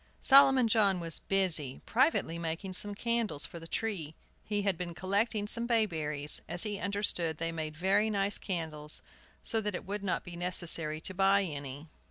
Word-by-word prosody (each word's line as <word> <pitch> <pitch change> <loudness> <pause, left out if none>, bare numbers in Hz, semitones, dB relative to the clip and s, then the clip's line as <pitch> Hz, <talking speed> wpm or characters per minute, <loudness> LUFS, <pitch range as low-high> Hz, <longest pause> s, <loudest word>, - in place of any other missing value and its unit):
Solomon 270 -3 +6
John 205 -4 +3
was 165 -2 +1
busy, 170 -9 +1
privately 240 - +1
making 170 +3 -4
some 205 +2 0
candles 235 -8 -1
for 170 - -8
the 165 - -11
tree. 170 -7 -3 0.3
He 205 -1 -2
had 195 -2 +1
been 175 0 -6
collecting 205 +4 -1
some 230 +2 +2
bayberries, 155 -11 0
as 175 - +3
he 205 -2 -2
understood 200 -6 -1
they 165 +1 -2
made 155 -1 -5
very 200 +5 +2
nice 200 -1 -1
candles, 160 -5 -2 0.4
so 225 - +1
that 210 -2 -3
it - - -6
would 200 +1 -5
not 185 - -1
be 175 - -9
necessary 170 -3 +1
to 190 - -1
buy 195 +1 +3
any. 145 -3 -6
190 Hz, 175 wpm, -31 LUFS, 165-210 Hz, 0.4 s, Solomon